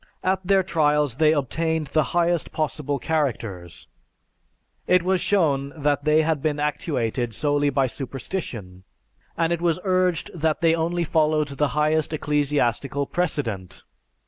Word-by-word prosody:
At 190 Hz, 0 st, +1 dB
their 190 Hz, +1 st, +3 dB
trials 150 Hz, -7 st, +1 dB
they 155 Hz, -1 st, +4 dB
obtained 160 Hz, +2 st, -1 dB
the 155 Hz, -2 st, +3 dB
highest 170 Hz, -1 st, +1 dB
possible 150 Hz, -2 st, -2 dB
characters. 115 Hz, -, -3 dB, 1.0 s
It 180 Hz, -1 st, +4 dB
was 185 Hz, 0 st, +1 dB
shown 145 Hz, -8 st, +1 dB
that 145 Hz, 0 st, 0 dB
they 155 Hz, +1 st, +4 dB
had 155 Hz, -3 st, 0 dB
been 150 Hz, -1 st, -1 dB
actuated 125 Hz, -6 st, -2 dB
solely 145 Hz, -1 st, +1 dB
by 135 Hz, -1 st, +1 dB
superstition, 125 Hz, -, -6 dB, 0.5 s
and 165 Hz, 0 st, +1 dB
it 170 Hz, -, -3 dB
was 170 Hz, -1 st, +1 dB
urged 185 Hz, -3 st, +1 dB
that 160 Hz, -2 st, -1 dB
they 165 Hz, -1 st, +4 dB
only 170 Hz, +1 st, 0 dB
followed 155 Hz, -1 st, +1 dB
the 145 Hz, +1 st, 0 dB
highest 155 Hz, +1 st, +1 dB
ecclesiastical 145 Hz, -2 st, 0 dB
precedent. 135 Hz, -, -3 dB
150 Hz, 135 wpm, -23 LUFS, 140-165 Hz, 1.0 s, they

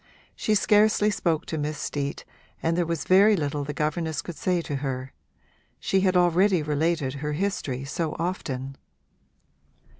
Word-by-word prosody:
She 215 Hz, -, +1 dB
scarcely 210 Hz, +1 st, +4 dB
spoke 165 Hz, -5 st, 0 dB
to 160 Hz, -, -4 dB
Miss 150 Hz, +1 st, -2 dB
Steet 140 Hz, -1 st, -4 dB, 0.4 s
and 165 Hz, +1 st, +1 dB
there 175 Hz, -1 st, 0 dB
was 165 Hz, -2 st, -2 dB
very 200 Hz, +3 st, +6 dB
little 145 Hz, -4 st, -2 dB
the 145 Hz, -, -4 dB
governess 155 Hz, +1 st, -2 dB
could 175 Hz, -, -7 dB
say 180 Hz, +2 st, 0 dB
to 145 Hz, -, -3 dB
her: 135 Hz, -1 st, -4 dB, 0.7 s
she 195 Hz, -, +1 dB
had 185 Hz, -1 st, +3 dB
already 180 Hz, 0 st, +3 dB
related 150 Hz, -2 st, 0 dB
her 150 Hz, 0 st, -2 dB
history 145 Hz, -7 st, -2 dB
so 155 Hz, +2 st, -3 dB
often. 135 Hz, -6 st, -4 dB
160 Hz, 150 wpm, -26 LUFS, 145-185 Hz, 0.7 s, very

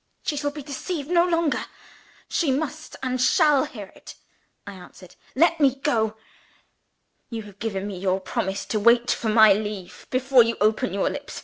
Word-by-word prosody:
"She 300 Hz, -, -1 dB
shall 290 Hz, 0 st, -1 dB
be 290 Hz, 0 st, -9 dB
deceived 290 Hz, +3 st, -5 dB
no 350 Hz, 0 st, +4 dB
longer 335 Hz, -3 st, 0 dB, 0.6 s
she 315 Hz, -6 st, 0 dB
must, 310 Hz, +3 st, -4 dB
and 255 Hz, -1 st, -1 dB
shall, 295 Hz, -1 st, +4 dB
hear 205 Hz, -5 st, -10 dB
it," -, -, -12 dB, 0.5 s
I 200 Hz, -, -8 dB
answered. 180 Hz, -1 st, -14 dB, 0.2 s
"Let 335 Hz, +3 st, +3 dB
me 275 Hz, -3 st, +3 dB
go!" 220 Hz, -6 st, -1 dB, 1.1 s
"You 225 Hz, -2 st, -5 dB
have 205 Hz, -1 st, -15 dB
given 200 Hz, -4 st, -3 dB
me 200 Hz, -3 st, -6 dB
your 190 Hz, 0 st, 0 dB
promise 190 Hz, +1 st, -3 dB
to 215 Hz, -, -2 dB
wait 235 Hz, +3 st, +4 dB
for 225 Hz, -, -1 dB
my 215 Hz, -1 st, +7 dB
leave 205 Hz, -2 st, -6 dB
before 260 Hz, 0 st, +4 dB
you 230 Hz, 0 st, +1 dB
open 215 Hz, -2 st, +1 dB
your 195 Hz, +1 st, 0 dB
lips. -, -, -7 dB
235 Hz, 175 wpm, -24 LUFS, 205-290 Hz, 1.1 s, my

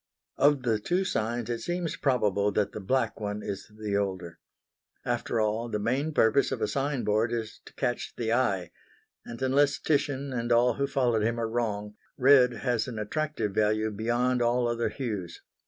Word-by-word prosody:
Of 140 Hz, -2 st, +4 dB
the 115 Hz, -3 st, +1 dB
two 180 Hz, -, 0 dB
signs 115 Hz, -4 st, -1 dB
it 120 Hz, -, -2 dB
seems 175 Hz, +1 st, -2 dB
probable 105 Hz, -7 st, +1 dB
that 105 Hz, 0 st, +1 dB
the -, -, -6 dB
black 115 Hz, +3 st, 0 dB
one 105 Hz, 0 st, -4 dB
is 100 Hz, -2 st, -5 dB
the 105 Hz, -2 st, -2 dB
older. 95 Hz, -4 st, -3 dB, 0.7 s
After 120 Hz, -1 st, -1 dB
all, 110 Hz, +2 st, 0 dB
the 105 Hz, -, -1 dB
main 130 Hz, +9 st, 0 dB
purpose 140 Hz, -1 st, +3 dB
of -, -, -2 dB
a -, -, 0 dB
sign 140 Hz, -1 st, -1 dB
board 110 Hz, +2 st, +1 dB
is 115 Hz, -2 st, -4 dB
to -, -, -14 dB
catch 120 Hz, -, -2 dB
the 115 Hz, -1 st, 0 dB
eye, 100 Hz, -8 st, 0 dB, 0.6 s
and 115 Hz, -, -7 dB
unless 140 Hz, +2 st, +3 dB
Titian 140 Hz, -2 st, -1 dB
and 120 Hz, -1 st, -2 dB
all 120 Hz, +1 st, +4 dB
who 140 Hz, +3 st, -1 dB
followed 125 Hz, -5 st, +1 dB
him 115 Hz, +2 st, 0 dB
are 115 Hz, -, 0 dB
wrong, 105 Hz, -3 st, -3 dB, 0.2 s
red 130 Hz, -1 st, +6 dB
has 120 Hz, -1 st, +1 dB
an 120 Hz, -3 st, -6 dB
attractive 115 Hz, 0 st, -2 dB
value 110 Hz, +1 st, +1 dB
beyond 120 Hz, +4 st, 0 dB
all 120 Hz, +1 st, +2 dB
other 120 Hz, -1 st, 0 dB
hues. 105 Hz, -7 st, -5 dB
120 Hz, 180 wpm, -28 LUFS, 105-130 Hz, 0.7 s, red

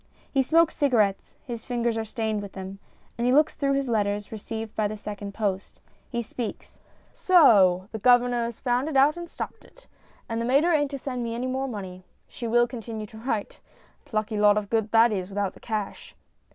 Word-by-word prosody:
He 270 Hz, -, +3 dB
smokes 325 Hz, +4 st, +3 dB
cigarettes 220 Hz, -9 st, +1 dB
his 235 Hz, -3 st, -6 dB
fingers 240 Hz, -2 st, 0 dB
are 225 Hz, 0 st, -2 dB
stained 220 Hz, -2 st, -2 dB
with 200 Hz, -1 st, -9 dB
them 190 Hz, +1 st, -7 dB, 0.4 s
and 250 Hz, +2 st, +3 dB
looks 305 Hz, +1 st, +4 dB
through 275 Hz, -1 st, 0 dB
his 275 Hz, -1 st, 0 dB
letters 205 Hz, -3 st, -1 dB
received 220 Hz, 0 st, -6 dB
by 215 Hz, -1 st, +1 dB
the 215 Hz, +1 st, -6 dB
second 205 Hz, -1 st, -7 dB
post. 200 Hz, -3 st, -3 dB, 0.3 s
He 235 Hz, -2 st, -2 dB
speaks: 230 Hz, 0 st, -7 dB, 0.3 s
So 195 Hz, -, +5 dB
the 220 Hz, -, -5 dB
governor 245 Hz, +1 st, +4 dB
has 235 Hz, -1 st, -6 dB
found 250 Hz, +3 st, 0 dB
it 285 Hz, -, 0 dB
out 280 Hz, +3 st, +5 dB
and 345 Hz, -1 st, -7 dB
stopped -, -, -7 dB
it, -, -, -20 dB, 0.4 s
and 230 Hz, 0 st, -2 dB
the -, -, -1 dB
mater 285 Hz, +8 st, +3 dB
ain't 290 Hz, -2 st, +2 dB
to 280 Hz, -, -5 dB
send 250 Hz, -2 st, -4 dB
me 230 Hz, 0 st, -3 dB
any 245 Hz, +2 st, -3 dB
more 260 Hz, +1 st, -2 dB
money. 190 Hz, -6 st, -7 dB, 0.2 s
She 235 Hz, -, -6 dB
will 240 Hz, +1 st, +4 dB
continue 225 Hz, -2 st, -6 dB
to 220 Hz, +1 st, -12 dB
write.... 225 Hz, -3 st, -3 dB, 0.5 s
Plucky 215 Hz, -1 st, -2 dB
lot 210 Hz, 0 st, +5 dB
of 205 Hz, -1 st, -3 dB
good 220 Hz, -2 st, +1 dB
that 230 Hz, +1 st, +5 dB
is 185 Hz, -3 st, -3 dB
without 200 Hz, -1 st, -2 dB
the -, -, -16 dB
cash. 215 Hz, -3 st, -5 dB
230 Hz, 200 wpm, -26 LUFS, 210-255 Hz, 0.5 s, So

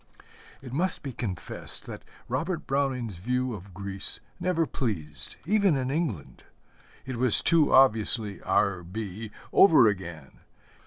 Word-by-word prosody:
It 125 Hz, -2 st, -9 dB
must 175 Hz, +5 st, -1 dB
be 135 Hz, -3 st, -5 dB
confessed 105 Hz, -7 st, -1 dB
that -, -, -8 dB, 0.3 s
Robert 155 Hz, +7 st, -3 dB
Browning's 130 Hz, -7 st, -1 dB
view 125 Hz, +6 st, -1 dB
of 100 Hz, -1 st, -10 dB
Greece 100 Hz, +1 st, -2 dB, 0.2 s
never 175 Hz, -2 st, +1 dB
pleased, 80 Hz, -, -5 dB
even 200 Hz, -4 st, +3 dB
in 130 Hz, 0 st, -2 dB
England. 140 Hz, -, -3 dB, 0.6 s
It 130 Hz, -2 st, -5 dB
was 125 Hz, -1 st, +3 dB
too 160 Hz, -3 st, +3 dB
obviously 110 Hz, -5 st, +3 dB
R. 95 Hz, -3 st, +1 dB
B. 105 Hz, +4 st, -6 dB, 0.2 s
over 155 Hz, -, +7 dB
again. 85 Hz, -8 st, -5 dB
120 Hz, 125 wpm, -27 LUFS, 100-140 Hz, 0.6 s, over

